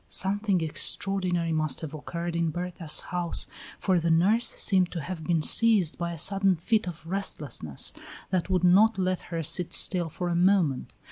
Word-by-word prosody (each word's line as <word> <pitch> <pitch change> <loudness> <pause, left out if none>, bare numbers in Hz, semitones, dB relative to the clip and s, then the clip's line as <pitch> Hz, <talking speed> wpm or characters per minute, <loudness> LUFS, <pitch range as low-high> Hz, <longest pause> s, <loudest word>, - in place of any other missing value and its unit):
Something 195 -1 +1
extraordinary 175 +1 0
must 155 -4 -2
have 160 -2 -7
occurred 170 +3 -6
in 170 -1 0
Berta's 175 -1 +1
house, 175 -1 -2 0.3
for 185 -3 0
the 170 0 -2
nurse 200 +9 +3
seemed 185 -3 +2
to 170 - -4
have 165 +2 -7
been 165 -1 0
seized 210 -8 +2
by 170 0 -3
a 170 - -7
sudden 195 +3 +3
fit 215 +5 -1
of 165 -2 -8
restlessness 150 - -4 0.4
that 185 -1 -1
would 185 -2 0
not 200 +4 +4
let 185 -1 -1
her 165 -1 -4
sit 175 +3 +1
still 175 -3 +5
for 175 +3 -5
a 170 - -1
moment. 175 -6 0
175 Hz, 175 wpm, -26 LUFS, 165-190 Hz, 0.4 s, still